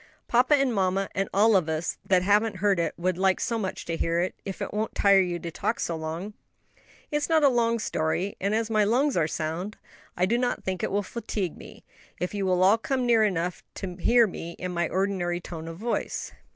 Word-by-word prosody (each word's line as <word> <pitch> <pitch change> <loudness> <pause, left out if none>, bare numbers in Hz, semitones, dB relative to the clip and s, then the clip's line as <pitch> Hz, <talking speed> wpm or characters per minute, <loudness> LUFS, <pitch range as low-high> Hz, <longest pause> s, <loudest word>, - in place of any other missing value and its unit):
"Papa 250 +5 +4
and 270 -3 +1
mamma, 195 -1 0
and 195 0 -1
all 215 +2 +4
of 175 -4 +2
us 160 +1 -2
that 185 -2 +3
haven't 210 +2 +3
heard 195 -1 +2
it, 165 -2 -1
would 180 +1 -1
like 190 -1 +3
so 230 -1 -1
much 190 -3 -4
to 165 - -2
hear 165 +1 0
it, 180 +2 0
if 195 - -6
it - - -4
won't 215 +1 -2
tire 200 -1 +5
you 175 -2 -1
to 170 0 -6
talk - - -2
so 170 - -1
long." 160 +6 -5 0.8
"It 295 - +2
is 295 - -2
not 320 -2 +4
a 280 - +7
long 235 -2 +2
story; 180 -1 -1
and 200 +3 +1
as 225 0 -1
my 215 -1 +3
lungs 260 +7 +2
are 165 -3 +2
sound, 165 +6 -4 0.4
I 180 - +3
do 235 +5 +1
not 245 -1 -1
think 185 -1 -3
it - - -1
will 205 +1 0
fatigue 200 -5 -4
me, - - -13 0.3
if 180 - -2
you 200 -2 -1
will 185 0 +3
all 205 +4 +5
come 255 +2 -1
near 230 -2 +4
enough 180 -3 -1
to 185 -3 -5
hear 235 +5 +5
me 170 -4 -6
in 180 +1 -5
my 170 -2 -1
ordinary 185 -2 -1
tone 165 -2 -8
of 165 0 -7
voice." 230 +5 -3
195 Hz, 230 wpm, -26 LUFS, 175-225 Hz, 0.8 s, a